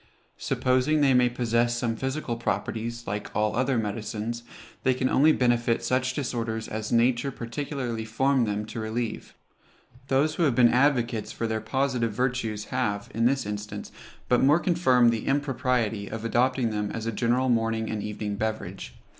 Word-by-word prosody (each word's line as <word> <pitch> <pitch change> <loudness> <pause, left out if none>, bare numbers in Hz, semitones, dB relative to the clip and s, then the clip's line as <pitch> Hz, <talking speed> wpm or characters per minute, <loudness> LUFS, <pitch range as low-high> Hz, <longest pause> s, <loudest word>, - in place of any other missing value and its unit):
Supposing 130 +4 +1
they 135 -2 +5
may 125 -1 +4
possess 120 0 +1
some 120 -1 -1
physical 130 0 -3
properties, 115 0 -3
like 105 +1 -4
all 105 0 +1
other 130 +1 +1
medicines, 110 +2 -3 0.4
they 130 -1 +2
can 130 0 0
only 150 +4 +5
benefit 120 -4 +1
such 130 0 0
disorders 115 -5 -3
as 110 0 -4
nature 120 +3 +2
particularly 125 -1 -4
formed 125 +2 +1
them 105 +1 -2
to 110 - -7
relieve. 110 +1 -4 0.7
Those 140 +3 +2
who 170 - 0
have 135 -5 +2
been 120 -1 +5
advocates 125 -4 +2
for 115 - -3
their 110 -1 -1
positive 125 -1 0
virtues 115 -3 -1
have, 105 -5 -1
in 115 +1 +1
this 135 -1 +2
instance, 105 0 -5 0.4
but 125 - +3
more 145 +5 +5
confirmed 140 -9 +4
the 115 -2 -3
impropriety 125 -7 0
of 110 +1 -5
adopting 125 0 +1
them 105 -1 -2
as 115 +1 -5
a 115 - -1
general 120 +3 +1
morning 115 -1 +1
and 110 -1 -3
evening 105 -1 -4
beverage. 110 0 -4
120 Hz, 165 wpm, -26 LUFS, 110-130 Hz, 0.7 s, they